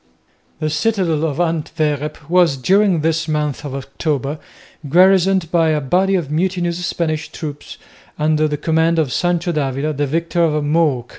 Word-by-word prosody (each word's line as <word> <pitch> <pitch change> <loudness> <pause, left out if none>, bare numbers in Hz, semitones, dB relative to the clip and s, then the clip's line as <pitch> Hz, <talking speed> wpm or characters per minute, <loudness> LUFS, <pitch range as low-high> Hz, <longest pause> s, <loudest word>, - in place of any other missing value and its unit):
The 155 -1 -1
citadel 165 -2 0
of 150 -1 -3
Antwerp 150 -3 -2
was, 170 -4 +3
during 190 +4 +2
this 165 +1 0
month 150 -2 -2
of 140 -2 -5
October, 140 +1 -3 0.5
garrisoned 185 +1 +4
by 165 -2 +3
a 155 -1 +1
body 185 +7 +1
of 160 -6 -2
mutinous 175 +1 -1
Spanish 160 -3 -2
troops 145 -2 -7 0.4
under 155 0 +2
the 150 -1 -2
command 160 +2 +1
of 150 -6 0
Sancho 175 0 0
d'Avila, 145 0 -1
the 145 0 -1
victor 170 +3 0
of 150 -2 +1
Mook. 145 -5 +1
160 Hz, 150 wpm, -18 LUFS, 150-175 Hz, 0.5 s, garrisoned